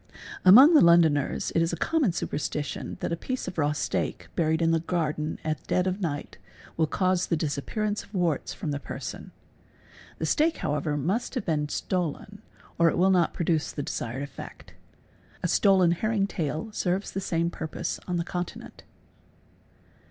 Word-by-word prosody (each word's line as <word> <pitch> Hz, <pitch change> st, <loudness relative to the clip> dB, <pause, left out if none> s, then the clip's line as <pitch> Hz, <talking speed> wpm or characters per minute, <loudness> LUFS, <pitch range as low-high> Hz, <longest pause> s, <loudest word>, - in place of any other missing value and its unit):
Among 255 Hz, -, +9 dB
the 310 Hz, -, +7 dB
Londoners 165 Hz, -4 st, +4 dB
it 165 Hz, -, +3 dB
is 165 Hz, -, +1 dB
a -, -, -1 dB
common 305 Hz, -, +1 dB
superstition 150 Hz, -2 st, -3 dB
that -, -, -2 dB
a -, -, +1 dB
piece 255 Hz, +9 st, -4 dB
of 180 Hz, -, -5 dB
raw 145 Hz, -1 st, +2 dB
steak 150 Hz, -, -2 dB
buried 160 Hz, -1 st, +1 dB
in 165 Hz, -1 st, +2 dB
the 165 Hz, -, +3 dB
garden 155 Hz, -2 st, -2 dB
at 155 Hz, -1 st, -2 dB
dead 180 Hz, -, +1 dB
of 190 Hz, +2 st, -2 dB
night 145 Hz, -5 st, -4 dB, 0.4 s
will 160 Hz, -1 st, +2 dB
cause 185 Hz, +1 st, +1 dB
the 165 Hz, -, +1 dB
disappearance 205 Hz, +9 st, -2 dB
of -, -, -18 dB
warts 175 Hz, -7 st, 0 dB
from 165 Hz, -7 st, -4 dB
the 140 Hz, -, -2 dB
person. -, -, -7 dB, 0.9 s
The -, -, -2 dB
steak 320 Hz, +1 st, +2 dB
however 150 Hz, 0 st, -1 dB
must 195 Hz, -, -1 dB
have 250 Hz, -, -2 dB
been 150 Hz, -3 st, 0 dB
stolen 185 Hz, +5 st, -3 dB, 0.4 s
or 170 Hz, 0 st, +6 dB
it -, -, -2 dB
will 190 Hz, +2 st, +4 dB
not 180 Hz, -2 st, +2 dB
produce 160 Hz, -2 st, 0 dB
the 145 Hz, -, -4 dB
desired 125 Hz, +2 st, -4 dB
effect. 140 Hz, -, -10 dB, 0.7 s
A'stolen 185 Hz, 0 st, +4 dB
herring 205 Hz, +3 st, +1 dB
tail 165 Hz, 0 st, -3 dB
serves 190 Hz, -1 st, -1 dB
the 195 Hz, -, -3 dB
same 170 Hz, -2 st, 0 dB
purpose 160 Hz, -2 st, -4 dB
on 180 Hz, -1 st, -1 dB
the 170 Hz, -, 0 dB
Continent. 175 Hz, -1 st, -6 dB
170 Hz, 165 wpm, -27 LUFS, 155-190 Hz, 0.9 s, Among